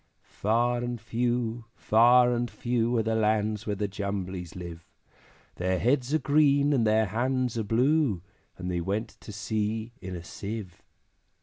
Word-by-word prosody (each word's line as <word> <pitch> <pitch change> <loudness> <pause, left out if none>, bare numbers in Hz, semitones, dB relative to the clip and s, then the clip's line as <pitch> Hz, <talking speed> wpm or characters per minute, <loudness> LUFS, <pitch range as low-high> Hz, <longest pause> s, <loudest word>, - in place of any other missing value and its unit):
Far 120 +3 0
and 120 0 -3
few, 120 0 -1
far 120 +2 +5
and 120 0 -1
few, 120 0 0
Are 110 - +2
the 110 +1 0
lands 110 -1 +1
where 105 - 0
the 105 +1 -1
Jumblies 95 -3 -4
live; 85 -2 -8 0.7
Their 90 +1 0
heads 125 +4 +1
are 155 - +4
green, 145 0 +3
and 115 -5 +2
their 110 +1 +3
hands 125 +4 -1
are 115 - 0
blue, 120 - +2 0.3
And 90 0 -4
they 90 -1 -1
went 100 +6 -2
to - - -10
sea 110 +2 -2
in 95 -1 -6
a 85 - -7
Sieve. 100 0 -7
110 Hz, 160 wpm, -28 LUFS, 100-120 Hz, 0.7 s, far